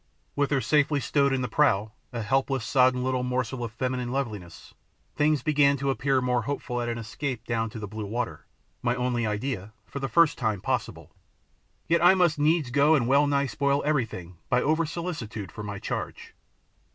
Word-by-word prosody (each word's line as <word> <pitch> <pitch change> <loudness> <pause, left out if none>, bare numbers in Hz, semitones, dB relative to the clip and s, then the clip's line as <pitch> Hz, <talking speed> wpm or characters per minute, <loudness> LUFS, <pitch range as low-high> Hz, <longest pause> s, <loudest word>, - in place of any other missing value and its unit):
With 145 -1 +1
her 140 -3 +1
safely 145 0 +2
stowed 140 +2 +2
in 130 -1 0
the - - -1
prow, 110 -5 +2 0.2
a 115 -2 -4
helpless, 135 +2 0
sodden 130 -1 +3
little 130 0 0
morsel 125 0 -2
of 115 - -4
feminine 125 +1 -2
loveliness, 105 -11 -5 0.4
things 150 -3 +2
began 145 -2 +3
to 135 0 0
appear 135 -1 +1
more 125 -1 +1
hopeful 125 0 -3
and 120 0 -2
an 115 - -2
escape 115 +2 -5
down 115 -1 -1
to 110 -1 -6
blue 105 0 -6
water, 120 +3 -4 0.3
my 120 0 +1
only 125 -2 0
idea, 105 -1 -3
for 140 - -7
the 135 -1 -3
first 170 -2 +4
time 110 -5 0
possible. - - -3 0.8
Yet 170 +1 +2
I 180 +2 +7
must 175 -5 +2
needs 150 -3 +2
go 145 +4 +5
and 120 -6 +1
well 140 +3 +4
nigh 140 0 +2
spoil 140 +3 0
everything 110 - -2
by 125 - +2
over 160 +2 +1
solicitude 150 - -5
for 105 - -8
my 100 -1 -5
charge. - - -5
130 Hz, 185 wpm, -26 LUFS, 115-145 Hz, 0.8 s, I